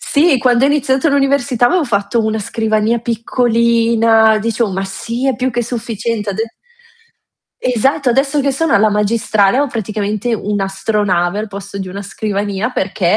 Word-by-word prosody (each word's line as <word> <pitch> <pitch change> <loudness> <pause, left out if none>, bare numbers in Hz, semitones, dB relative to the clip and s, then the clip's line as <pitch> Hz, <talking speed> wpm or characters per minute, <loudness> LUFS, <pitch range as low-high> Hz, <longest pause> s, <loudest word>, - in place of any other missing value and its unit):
Sì, 290 -2 +2
quando 245 +1 +3
io 285 - +3
ho - - +3
iniziato 275 0 +1
l'università 275 -3 +2
avevo 355 +2 +2
fatto 215 0 0
una 220 0 -1
scrivania 220 +2 0
piccolina, 230 -1 +2
dicevo: 230 -1 -1
"Ma 190 +1 -3
sì, 230 +6 -4
è 265 - +2
più 255 +3 -1
che 240 0 -1
sufficiente", 230 -2 -3
ad 195 - -6 1.2
Esatto, 255 +2 +1
adesso 275 +3 +1
che 275 0 0
sono 325 +4 0
alla 215 +1 +4
magistrale, 210 +1 +1
ho 290 - +2
praticamente 215 0 -2
un'astronave 195 -2 -1
al 215 0 -4
posto 200 0 -8
di 190 -1 -5
una 200 +2 -6
scrivania, 205 +2 -3
perché 190 -3 0
225 Hz, 155 wpm, -16 LUFS, 205-250 Hz, 1.2 s, alla